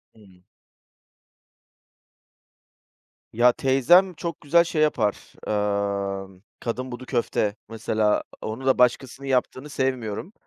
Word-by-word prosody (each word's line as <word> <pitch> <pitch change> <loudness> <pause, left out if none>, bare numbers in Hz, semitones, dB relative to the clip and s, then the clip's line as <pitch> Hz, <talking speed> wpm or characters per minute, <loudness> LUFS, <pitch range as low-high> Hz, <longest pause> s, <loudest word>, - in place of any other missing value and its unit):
Hımm. 95 -4 -20 2.9
Ya, 120 +2 +5
teyzem 155 +10 +4
çok 170 +1 -6
güzel 170 +4 +4
şey 160 -2 -2
yapar, 110 -9 0 0.9
ımm, 95 +1 -20 0.2
kadınbudu 125 +1 -5
köfte 115 -4 -1
mesela, 110 -1 0 0.2
onu 115 +5 -5
da 130 - +3
başkasının 130 +2 +1
yaptığını 130 +2 -1
sevmiyorum. 130 - -3
125 Hz, 90 wpm, -24 LUFS, 110-140 Hz, 2.9 s, Ya